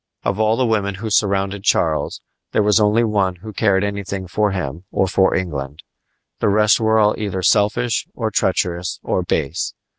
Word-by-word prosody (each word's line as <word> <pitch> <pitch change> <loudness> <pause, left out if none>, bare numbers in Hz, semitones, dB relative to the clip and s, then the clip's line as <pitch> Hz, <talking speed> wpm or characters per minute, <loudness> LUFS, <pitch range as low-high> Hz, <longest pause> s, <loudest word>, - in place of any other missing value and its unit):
Of 100 - -1
all 110 +1 +2
the 130 - +2
women 100 -4 0
who 110 +3 -5
surrounded 100 -1 +1
Charles 80 -6 0 0.3
there 105 - +3
was 105 +1 +4
only 105 +2 +3
one 100 -5 0
who 105 +5 -10
cared 100 -1 +2
anything 100 -1 -4
for 105 +4 +1
him 85 -4 -4
or 95 - +1
for 95 +1 +2
England. 75 -5 -4 0.6
The - - +2
rest 105 +1 +4
were 110 0 +2
all 105 -1 +4
either 95 -3 -3
selfish 105 +3 +2
or 110 -3 -2
treacherous 90 -2 -1
or - - 0
base. 80 -3 -2
100 Hz, 175 wpm, -19 LUFS, 95-105 Hz, 0.6 s, was